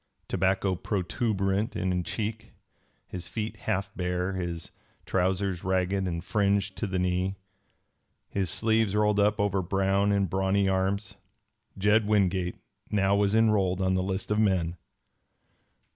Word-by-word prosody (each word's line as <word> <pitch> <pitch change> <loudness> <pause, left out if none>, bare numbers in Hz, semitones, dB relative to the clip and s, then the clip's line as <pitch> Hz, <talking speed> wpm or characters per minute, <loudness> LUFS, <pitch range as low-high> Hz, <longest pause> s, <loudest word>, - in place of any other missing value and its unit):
Tobacco 95 +1 +1
protuberant 100 +3 -1
in 90 -1 0
cheek, 110 +3 -4 0.5
his 90 -1 -5
feet 110 -1 -4
half 95 +2 -2
bare, 90 +1 -1
his 85 -3 -4 0.3
trousers 95 0 0
ragged 95 +1 0
and 85 -1 -3
fringed 100 0 +1
to 110 - -2
the 95 -1 -2
knee, 90 +1 0 0.9
his 95 -3 -1
sleeves 110 +2 +1
rolled 105 -1 +3
up 105 +1 +3
over 100 -2 +1
brown 95 +2 +1
and 100 -1 +2
brawny 95 +2 +1
arms, 95 +1 -1 0.6
Jed 105 +2 +3
Wingate 95 -4 +1 0.3
now 100 -1 +2
was 100 +1 +2
enrolled 105 -5 +3
on 95 -1 +1
the 95 - +1
list 95 +2 -3
of 105 - +2
men. 90 -5 +1
95 Hz, 130 wpm, -28 LUFS, 95-100 Hz, 0.9 s, rolled